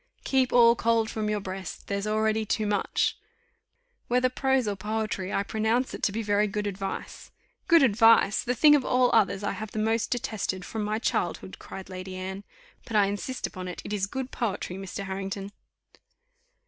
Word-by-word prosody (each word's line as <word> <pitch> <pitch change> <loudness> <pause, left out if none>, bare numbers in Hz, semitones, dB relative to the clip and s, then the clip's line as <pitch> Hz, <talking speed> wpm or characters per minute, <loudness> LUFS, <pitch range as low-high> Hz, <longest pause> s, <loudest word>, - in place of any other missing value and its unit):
'Keep 260 -2 +2
all 235 -1 +6
cold 230 -1 +1
from 215 -1 -2
your 210 0 0
breast, 190 -2 -7
there's 200 +1 -2
already 220 +1 +1
too 215 0 -1
much.'" 205 -1 0 0.9
"Whether 250 +1 +2
prose 265 -1 +1
or 205 - -1
poetry, 210 -1 -3
I 200 - 0
pronounce 220 +5 0
it - - -7
to - - +1
be 225 +2 -3
very 205 0 +2
good 210 +1 -3
advice." 195 -1 -5 0.4
"Good 335 -3 +6
advice! 225 -3 +5
the 250 0 -1
thing 295 +4 +7
of 280 - +2
all 250 0 +3
others 200 -2 +3
I - - 0
have 220 -1 -6
the - - -5
most 225 +1 +1
detested 205 -6 -2
from 220 -1 -4
my 210 +1 -1
childhood," 225 - -2
cried 190 - -9
Lady 185 0 -7
Anne; 190 +2 -5 0.4
"but 225 - -5
I 205 -1 +5
insist 205 +6 -3
upon 185 0 -6
it, 180 - -7
it - - -4
is 200 -1 0
good 260 +4 -5
poetry, 195 -5 -3
Mr. 195 +1 -6
Harrington." 195 +1 -5
210 Hz, 185 wpm, -27 LUFS, 195-230 Hz, 0.9 s, thing